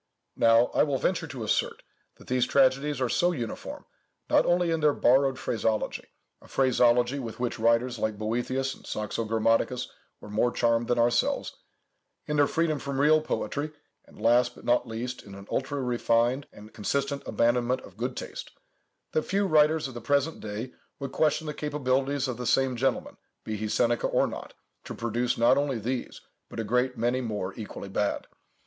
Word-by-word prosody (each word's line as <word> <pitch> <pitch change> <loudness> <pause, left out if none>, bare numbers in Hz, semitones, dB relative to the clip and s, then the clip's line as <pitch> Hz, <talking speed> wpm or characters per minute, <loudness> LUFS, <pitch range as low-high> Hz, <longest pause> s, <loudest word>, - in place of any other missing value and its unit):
Now, 115 +1 +4
I - - +3
will 145 -3 +2
venture 165 +2 -1
to 130 -6 -6
assert, 105 - -1 0.3
that - - -17
these 125 -1 +1
tragedies 135 +1 +2
are 130 - +1
so 175 +9 +2
uniform, 120 -9 -6 0.5
not - - +4
only 175 -1 +2
in 165 - +1
their 150 -2 +3
borrowed 135 +1 +3
phraseology—a 110 -3 -3
phraseology 125 0 +3
with 115 -3 -6
which 120 -2 -2
writers 115 +1 +2
like 110 -1 -1
Boethius 125 +5 -1
and - - -16
Saxo 110 +2 -3
Grammaticus 115 +3 +1 0.3
were 105 - -11
more 110 +4 +2
charmed 115 -1 +1
than 120 - +1
ourselves—in 120 +4 -2
their 145 -1 +4
freedom 160 -3 0
from 140 0 -4
real 155 +2 +5
poetry, 150 0 -3 0.3
and - - -18
last, 120 +1 +3
but - - -14
not 120 0 +2
least, 120 +3 -5
in 100 -1 -12
an 100 0 -10
ultra 140 +2 -1
refined 120 +1 +1
and 105 +1 -14
consistent 140 +6 -1
abandonment 120 +2 +1
of 95 - -14
good 125 +4 -3
taste, - - -6 0.6
that 155 - +1
few 200 +5 0
writers 155 -3 +3
of 130 - -9
the 120 - -7
present 145 +5 +1
day 110 +4 -6 0.2
would 135 -2 -5
question 155 +1 +1
the 150 - -3
capabilities 140 -2 0
of 125 -3 -3
the 125 -1 -4
same 135 -1 +2
gentleman, 130 +3 -1 0.3
be 110 - -4
he 110 +1 -3
Seneca 120 +2 +1
or - - +2
not, - - -7 0.3
to - - -7
produce 120 +1 -1
not 115 - +4
only 140 -3 -1
these, 120 +3 -4 0.3
but - - -7
a - - 0
great 125 +3 0
many 120 +3 +1
more 105 -5 -3
equally 105 -2 -7
bad. 100 +1 -1
125 Hz, 175 wpm, -27 LUFS, 115-140 Hz, 0.6 s, real